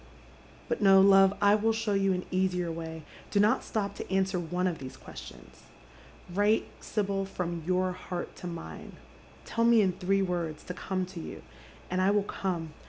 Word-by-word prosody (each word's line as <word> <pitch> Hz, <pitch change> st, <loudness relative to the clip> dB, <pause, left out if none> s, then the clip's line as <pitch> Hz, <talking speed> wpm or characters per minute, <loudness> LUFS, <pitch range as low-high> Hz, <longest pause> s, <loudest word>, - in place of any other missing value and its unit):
But -, -, -2 dB
no, 195 Hz, -1 st, +7 dB
love, 195 Hz, 0 st, +6 dB
I 205 Hz, 0 st, +6 dB
will 215 Hz, +2 st, +3 dB
show 220 Hz, -1 st, -1 dB
you 195 Hz, -1 st, +2 dB
an 180 Hz, -1 st, -1 dB
easier 180 Hz, -2 st, 0 dB
vf«y« 160 Hz, -1 st, -6 dB, 0.3 s
Do 205 Hz, -, +1 dB
not 210 Hz, +2 st, +3 dB
stop 205 Hz, -2 st, -2 dB
to -, -, -7 dB
answer 190 Hz, -1 st, +1 dB
one 180 Hz, +2 st, -2 dB
of 175 Hz, -4 st, -1 dB
these 130 Hz, -1 st, -8 dB
questions. -, -, -12 dB, 0.4 s
" 175 Hz, -, -18 dB
Write, 205 Hz, +3 st, +2 dB, 0.2 s
Sibyl, 200 Hz, -2 st, -1 dB
from 175 Hz, -3 st, -4 dB
your 185 Hz, 0 st, +2 dB
heart 180 Hz, -1 st, -6 dB
to 180 Hz, -, -7 dB
mine. 80 Hz, -, -8 dB, 0.5 s
Tell 230 Hz, -, -1 dB
me 230 Hz, -1 st, +6 dB
in 190 Hz, -, +2 dB
three 195 Hz, +2 st, +1 dB
words 170 Hz, -4 st, -3 dB
to 180 Hz, -, -6 dB
come 185 Hz, 0 st, -2 dB
to 180 Hz, -1 st, -9 dB
you, -, -, -8 dB, 0.5 s
and 185 Hz, 0 st, +1 dB
I 190 Hz, -, +4 dB
will 205 Hz, 0 st, +3 dB
come. 175 Hz, -6 st, -3 dB
185 Hz, 185 wpm, -29 LUFS, 175-200 Hz, 0.5 s, no